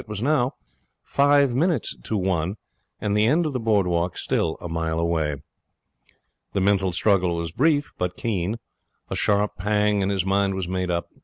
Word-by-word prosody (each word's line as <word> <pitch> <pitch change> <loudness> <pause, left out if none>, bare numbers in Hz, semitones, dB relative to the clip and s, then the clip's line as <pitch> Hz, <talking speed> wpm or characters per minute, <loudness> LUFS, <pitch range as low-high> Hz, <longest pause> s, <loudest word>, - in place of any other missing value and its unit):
It - - -21
was 105 0 -4
now 135 -2 +1 0.5
five 140 -2 +3
minutes 155 - 0
to 110 - -1
one, 95 0 -1 0.4
and 105 0 -1
the 105 +1 +4
end 160 +7 +3
of 150 - -2
the 130 - -1
board 110 -4 +2
walk 85 0 -1
still 80 -1 -1
a - - -6
mile 80 -1 -2
away. 80 -3 0 1.2
The - - +1
mental 95 -1 +2
struggle 90 -1 +2
was 85 -1 -3
brief 145 - +1
but 90 0 -2
keen. 105 -1 -1 0.5
A - - -1
sharp 105 0 +1
pang, 105 +1 +1
and 95 +1 0
his 95 -2 0
mind 100 0 +1
was 95 -2 -3
made 90 0 -2
up. 85 -1 -2
100 Hz, 180 wpm, -24 LUFS, 90-115 Hz, 1.2 s, the